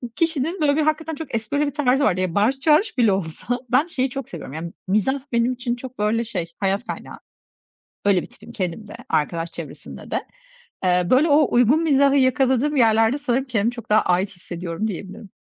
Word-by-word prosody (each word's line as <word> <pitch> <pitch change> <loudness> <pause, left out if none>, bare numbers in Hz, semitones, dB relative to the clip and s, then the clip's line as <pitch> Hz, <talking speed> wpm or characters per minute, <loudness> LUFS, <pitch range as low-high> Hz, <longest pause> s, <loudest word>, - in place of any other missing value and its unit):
kişinin, 330 +1 -1
böyle, 285 -1 +3
bir - - +3
hakikaten 315 +1 -1
çok 290 -4 -6
esprili 255 +7 0
bir 285 - -2
tarzı 275 -2 +2
vardı. 185 +1 +1
Ya, 185 -3 -2
bağırış 225 +7 +2
çağırış 315 +8 +3
bile 230 -4 +4
olsa 195 +7 -3
ben 275 +6 +3
şeyi 265 -6 -1
çok 270 -1 -6
seviyorum, 160 -6 -8
ya, 160 - -5 0.3
mizah 215 +8 +1
benim 235 +2 +2
için 245 -1 -3
çok, 255 0 -10
böyle, 215 +2 +1
şey 180 -7 -4
hayat 195 +4 0
kaynağı. - - -7 0.9
Öyle 195 -3 +3
bir - - -9
tipim 225 +3 -15
kendim 190 0 -4
de, - - -8
arkadaş 165 +2 -1
çevresinde - - -9
de. - - 0 0.6
Eee, 180 -1 +2
böyle, 280 +6 +4
o 295 0 +4
uygun 245 +7 +4
mizahı 280 -3 +4
yakaladığım 265 +2 +2
yerlerde 225 0 +4
sanırım 265 -2 -1
kendimi 230 -3 0
çok 235 -2 -10
daha 215 +1 +5
ait 180 +2 +1
hissediyorum 175 +1 -5
diyebilirim. 195 +1 -7
240 Hz, 190 wpm, -22 LUFS, 200-280 Hz, 0.9 s, daha